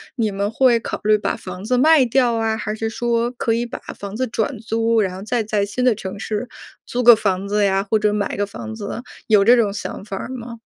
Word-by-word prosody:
你 225 -4 0
们 200 +1 -1
会 245 -2 +4
考 - - -5
虑 215 0 +4
把 - - -2
房 185 +1 -8
子 250 +4 0
卖 300 -1 +5
掉 245 -1 +2
啊？ 225 -1 0
还 215 -1 -4
是 225 +1 -3
说 235 0 0
可 235 -2 -1
以 235 +1 0
把 240 - -7 0.2
房 200 +1 -7
子 255 +2 -1
转 225 +3 -2
租， 225 0 +1
然 185 -2 -2
后 190 - -8
再 230 +2 0
在 210 -1 0
新 250 +5 -3
的 245 -4 +4
城 195 -1 -7
市， 220 +3 -3 0.4
租 245 - -2
个 240 -1 +9
房 195 -2 -1
子 205 0 +2
呀 195 0 +1
或 220 - +3
者 210 0 +1
买 205 -1 -2
个 205 - 0
房 220 +2 -8
子， 220 +2 -5 0.3
有 210 -3 +5
这 240 +4 +7
种 210 -4 +1
想 205 - -6
法 195 - -5
儿 - - -6
吗？ 235 -2 -7
220 Hz, 265 characters per minute, -20 LUFS, 205-240 Hz, 0.4 s, 个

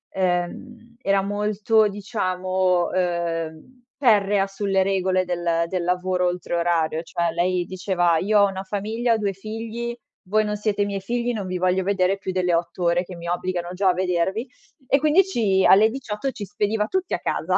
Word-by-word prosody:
ehm, 190 +6 -2
era 195 -2 +2
molto, 210 +2 +1
diciamo, 185 -3 0
ehm, 170 +5 -3
ferrea 205 -6 +3
sulle 195 -1 0
regole 185 -1 +1
del 170 -1 0
del 180 0 -2
lavoro 180 0 0
oltre 175 -1 -3
orario. 165 -2 +1
Cioè 170 0 -1
lei 175 +1 0
diceva: 180 -2 0
"Io 210 +4 +3
ho 200 - +6
una 190 0 -5
famiglia, 220 +4 -1
ho - - 0
2 200 -2 -1
figli, 225 +4 -5 0.4
voi 215 +1 +3
non 210 0 -2
siete 205 -1 0
i - - -1
miei 200 -1 -3
figli, 240 +4 -1
non 205 -4 -4
vi 185 0 -2
voglio 185 +1 +1
vedere 195 0 +1
più 190 -1 -4
delle 180 -1 0
8 170 +2 -1
ore 170 +1 +2
che 185 0 -10
mi 170 0 -8
obbligano 175 0 -2
già 190 +1 +2
a - - +4
vedervi." 185 +5 -1 0.5
E 275 - +6
quindi 310 +6 +4
ci 210 - +1
alle 210 +3 +6
18 240 0 -4
ci 230 - -7
spediva 210 +2 -1
tutti 375 +4 -2
a - - -5
casa. - - 0
190 Hz, 180 wpm, -23 LUFS, 180-215 Hz, 0.5 s, ho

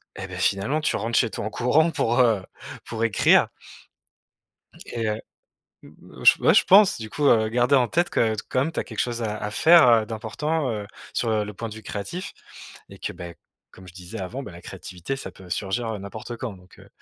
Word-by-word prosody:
et 95 - -6
beh, 90 - -9
finalement, 100 +11 0
tu - - 0
rentres 115 +1 -1
chez 115 - +3
toi 105 - -5
en - - -2
courant 150 +9 +2
pour, 120 -4 0
heu, 115 -6 +3 0.4
pour 115 -1 -4
écrire. 115 -4 +4 1.4
Et 115 -1 -4
heu, 105 +1 -2 0.6
mmh, - - -14
j - - +7
ouais, - - +4
je - - +5
pense, 200 +1 +6
du 110 -1 -7
coup, 150 - -3
heu, 110 -4 +4
garder 120 +4 +2
en 125 -2 +3
tête 175 +1 +1
que 110 -1 +1
t 105 - -5
comme 135 +5 0
tu - - -2
as - - -4
quelque 110 - -11
chose 120 -1 -1
à 105 -1 -2
à 105 - -3
faire, 160 +6 +6
heu, 115 -2 +4
d'important, 130 +7 -2
heu, 105 -2 -4 0.3
sur, 115 - -1
heu, 110 -1 +1
le 105 0 -8
point 115 +4 -5
de 105 - -9
vue 110 - -10
créatif, 105 - -6 0.6
et - - -13
que - - -4
beh, 85 -1 -9 0.3
comme 95 -1 -15
je - - -12
disais 90 0 -8
avant, 115 +9 -5
bah, 105 - -9
la 85 - -11
créativité 90 +9 -6
ça 135 - -7
peut 95 - -15
surgir, 110 +5 -2
heu, - - -5
n'importe 110 +4 -8
quand, 120 -1 -5
donc 90 0 -19
heu, - - -16
115 Hz, 225 wpm, -24 LUFS, 105-130 Hz, 1.4 s, j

